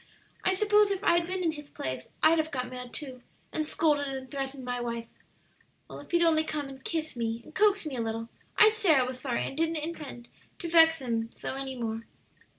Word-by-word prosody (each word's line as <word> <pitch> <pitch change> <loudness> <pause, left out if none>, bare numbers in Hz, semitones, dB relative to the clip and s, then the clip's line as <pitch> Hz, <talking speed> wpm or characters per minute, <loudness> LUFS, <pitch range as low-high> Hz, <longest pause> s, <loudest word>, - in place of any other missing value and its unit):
"I 375 - +3
suppose 420 +1 +4
if 395 0 -2
I'd 340 -2 +3
been 370 0 -2
in 330 - +2
his 295 -2 -9
place 130 -1 -5
I'd 320 +1 +6
have 315 0 0
got 255 -4 -3
mad, 250 -1 -7
too, 260 -5 -6 0.3
and 310 - 0
scolded 300 -2 +1
and 265 -1 -5
threatened 270 -2 -4
my 245 0 -2
wife. 235 -1 -3 0.8
Well, - - -9
if - - -13
he'd 345 0 +3
only 320 -2 +4
come 300 -2 -3
and 265 -1 -11
kiss 315 -2 -2
me 230 -1 -2
and - - -15
coax 410 -1 +3
me 295 -4 -4
a - - -1
little, 225 0 -3 0.3
I'd 435 0 +7
say 400 -8 +4
I 265 - +5
was 255 0 -4
sorry 255 -3 -1
and - - -5
didn't 325 +2 +1
intend 300 -6 -6 0.3
to 345 - -5
vex 325 -3 +6
him, 230 -2 -1
so - - -4
any 270 0 -4
more." 225 0 -3
285 Hz, 220 wpm, -29 LUFS, 250-330 Hz, 0.8 s, I'd